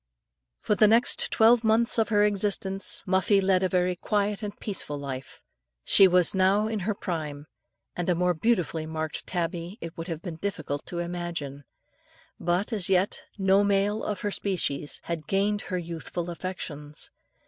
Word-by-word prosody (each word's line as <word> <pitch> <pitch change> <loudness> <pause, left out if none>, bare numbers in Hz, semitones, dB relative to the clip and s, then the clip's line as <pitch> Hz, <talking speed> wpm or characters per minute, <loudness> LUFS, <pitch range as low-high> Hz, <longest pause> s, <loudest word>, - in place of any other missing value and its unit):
For - - +2
the 215 +1 +5
next 230 +3 +3
twelve 230 +1 +5
months 230 +2 +3
of 225 - +2
her 205 -1 +3
existence, 195 -1 +2
Muffie 190 +1 +3
led 190 -1 +2
a 185 - +1
very 180 0 +1
quiet 205 +2 -1
and 205 -1 -6
peaceful 175 -8 -4
life. 135 -2 -7 0.4
She 195 - +6
was 180 -2 +4
now 195 +2 +3
in 220 -1 -2
her 200 +2 -2
prime 150 -6 -5 0.5
and 175 0 -2
a 180 - +3
more 180 +1 +2
beautifully 170 -4 0
marked 160 -1 -5
tabby 175 +2 -3
it 165 0 -8
would 165 +1 -6
have 165 -1 -5
been 170 -4 -6
difficult 160 -6 -4
to 175 - -5
imagine 170 -5 -4 0.7
but, 180 +7 0
as 195 -5 +2
yet, 190 +1 +1 0.2
no 195 0 +4
male 205 +1 +1
of 205 -3 -3
her 205 - -2
species 160 -8 -2
had 160 -3 -5
gained 200 +2 +1
her 185 - -1
youthful 170 0 -5
affections. 150 -5 -5
185 Hz, 165 wpm, -27 LUFS, 165-205 Hz, 0.7 s, She